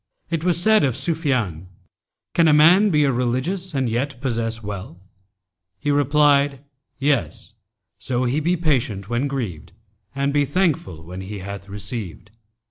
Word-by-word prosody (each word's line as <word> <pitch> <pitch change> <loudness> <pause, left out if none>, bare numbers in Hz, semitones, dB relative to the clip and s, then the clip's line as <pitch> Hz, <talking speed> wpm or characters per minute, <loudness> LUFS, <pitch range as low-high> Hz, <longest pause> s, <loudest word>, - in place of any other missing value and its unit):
[FN#284] 170 - -16
It 155 - -8
was 175 -1 +2
said 215 +4 +4
of 130 -4 0
Sufyan,[FN#285] 130 - -1 0.7
'Can 170 -1 +4
a 155 - +5
man 175 +8 +6
be 150 -5 +3
a 140 - +3
religious 130 +9 -2
and 135 -2 +1
yet 125 +3 -2
possess 115 -3 -2
wealth?' 100 -4 -7 0.8
He 145 - -1
replied, 145 -1 +3 0.4
'Yes, 140 -2 -1 0.5
so 125 -1 -1
he 130 +4 +1
be 175 +4 +1
patient 120 - -1
when 120 +4 0
grieved 110 - -5 0.4
and 140 +1 0
be 145 0 +3
thankful 140 - -1
when 90 +3 -8
he 100 +2 -6
hath 100 +1 -8
received.' 100 -1 -7
135 Hz, 150 wpm, -22 LUFS, 105-150 Hz, 0.8 s, man